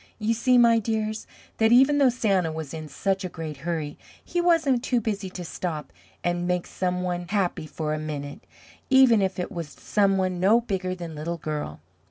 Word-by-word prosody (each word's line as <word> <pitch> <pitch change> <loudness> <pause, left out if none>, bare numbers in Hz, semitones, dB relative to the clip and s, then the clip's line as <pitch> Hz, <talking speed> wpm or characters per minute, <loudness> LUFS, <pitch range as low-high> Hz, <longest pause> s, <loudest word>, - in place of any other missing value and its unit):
You 225 +1 0
see, 250 +2 +3
my 235 -1 +6
dears, 220 0 -2 0.3
that 220 0 +4
even 270 +4 +6
though 275 -2 +6
Santa 195 -9 +1
was 155 -2 -6
in 155 -1 -6
such 190 +6 -1
a 185 - -3
great 160 -3 -6
hurry, 155 -1 -4 0.3
he 350 - -1
wasn't 320 -8 +3
too 245 -2 +1
busy 205 -3 -3
to 180 -1 -7
stop 160 -3 -5 0.3
and 175 0 0
make 180 -1 0
some 180 -1 -2
one 175 -1 -3
happy 185 -5 -1
for 155 -1 -3
a 155 - -2
minute, 145 -2 -6 0.5
even 260 -5 +6
if 190 -1 -1
it 180 +3 -3
was 170 -6 -5
some 195 +6 +1
one 185 -1 0
no 205 +6 +5
bigger 190 -5 -3
than 170 -3 -7
Little 160 +3 -4
Girl. 150 - -5
185 Hz, 195 wpm, -25 LUFS, 165-225 Hz, 0.5 s, my